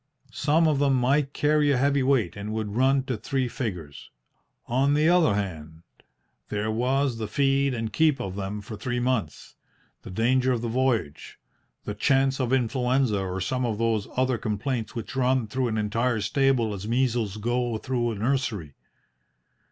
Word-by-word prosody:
Some 155 +3 +2
of 150 -3 +2
them 140 -2 +3
might 135 +3 +2
carry 150 0 +2
a 140 - +3
heavy 140 +1 +2
weight, 130 -9 +1
and 105 +1 -5
would 110 -2 -3
run 135 +2 +3
to 130 -3 -3
three 130 +3 -1
figures. 90 - -6 0.6
On 135 +4 +2
the 155 +1 +3
other 170 - +4
hand, 80 -5 -5 0.7
there 105 +1 -2
was 125 +2 0
the 110 - -3
feed 135 +3 +1
and 115 -2 -4
keep 155 +2 +3
of 95 -1 -4
them 100 +1 -4
for 110 +2 -8
three 120 +4 -3
months, 120 -10 -2 0.4
the - - -10
danger 125 +6 +2
of 120 -1 -3
the - - -1
voyage, 115 - -1 0.5
the 105 - -4
chance 135 +4 +2
of 130 -2 -1
influenza 125 -2 +1
or 95 -1 -3
some 125 +8 -1
of 115 -4 -1
those 115 -2 0
other 130 -2 +1
complaints 110 +2 -3
which 115 +2 -6
run 130 -1 +2
through 130 +4 -1
an 110 -1 -2
entire 115 +3 0
stable 120 +1 +1
as 100 +1 -6
measles 115 -4 0
go 120 +1 -1
through 120 0 -1
a 115 - -3
nursery. 110 - -2
120 Hz, 170 wpm, -26 LUFS, 105-135 Hz, 0.7 s, other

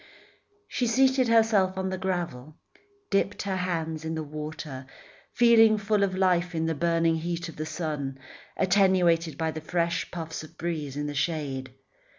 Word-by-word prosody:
She 245 - -1
seated 260 +2 +3
herself 220 -5 +3
on 190 0 -1
the 185 - -2
gravel, 170 -7 -3 0.6
dipped 195 +1 +1
her 195 -2 -2
hands 165 -3 -2
in 160 0 -3
the 160 - -3
water, 150 -2 -7 0.5
feeling 225 -2 +6
full 210 0 +1
of 185 -1 0
life 180 -2 +2
in 160 0 0
the 165 - 0
burning 165 +1 +1
heat 170 +1 -3
of 165 - -11
the 155 +1 -4
sun, 150 -4 -3 0.4
attenuated 180 -4 +3
by 160 -1 -1
the 155 - -6
fresh 170 +1 -1
puffs 165 -2 -6
of 160 +1 -14
breeze 155 -5 -3
in 145 - -2
the 145 - -3
shade. 140 -4 -2
170 Hz, 165 wpm, -27 LUFS, 155-190 Hz, 0.6 s, feeling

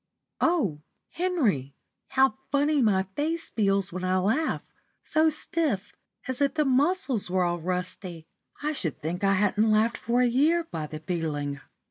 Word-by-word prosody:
O 235 - +1 0.3
Henry, 245 - 0 0.3
how 265 -3 +3 0.2
funny 290 +1 +2
my 200 -5 +3
face 325 +3 -2
feels 195 -3 +1
when 185 0 -4
I 185 0 +2
laugh, 225 +13 0 0.4
so 315 0 +3
stiff, 295 - -2 0.3
as 260 +1 -2
if 280 - +2
the 300 - +2
muscles 270 - +1
were 185 0 +2
all 175 0 0
rusty! 180 -1 -4 0.4
I 300 - +1
should 175 - -3
think 175 +5 -3
I 195 0 +4
hadn't 205 +2 +2
laughed 215 +2 +3
for 240 +2 +1
a - - +4
year 300 +8 +3
by 160 - -5
the 155 0 -8
feeling." 150 -4 -3
215 Hz, 155 wpm, -27 LUFS, 180-290 Hz, 0.4 s, I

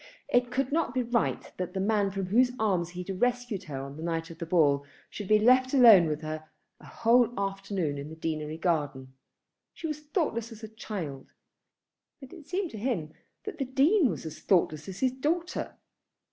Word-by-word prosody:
It 245 0 +3
could 260 +2 -1
not 305 -5 0
be 255 - +1
right 235 -1 -1
that 180 +1 -4
the - - -1
man 205 0 +2
from 195 0 -3
whose 245 +6 +3
arms 185 -6 0
he 180 0 -6
had 185 0 -6
rescued 245 -5 0
her 140 -5 -5
on 140 +1 -8
the - - -8
night 165 0 -3
of 165 - -12
the 170 - -5
ball 145 -5 +3 0.3
should 205 - -6
be 215 - +5
left 255 +5 +4
alone 220 -10 +8
with 155 0 -2
her 155 0 -6 0.3
a - - -15
whole 235 0 +3
afternoon 195 -6 -2
in 140 +2 -7
the 160 - -9
Deanery 155 -1 -3
Garden! 145 -6 -1 0.6
She - - -8
was 305 -2 -3
thoughtless 295 - -2
as 225 0 -12
a - - -5
child; 180 -11 -7 0.9
but 270 -3 -12
it 325 -6 -13
seemed 370 -2 -2
to 220 - -7
him 195 -10 -2 0.3
that 420 -6 -7
the 270 - 0
Dean 280 - +3
was - - -5
as 160 - -7
thoughtless 155 -4 +1
as 190 - -8
his 260 -1 +3
daughter. 325 +7 -2
205 Hz, 200 wpm, -28 LUFS, 165-250 Hz, 0.9 s, alone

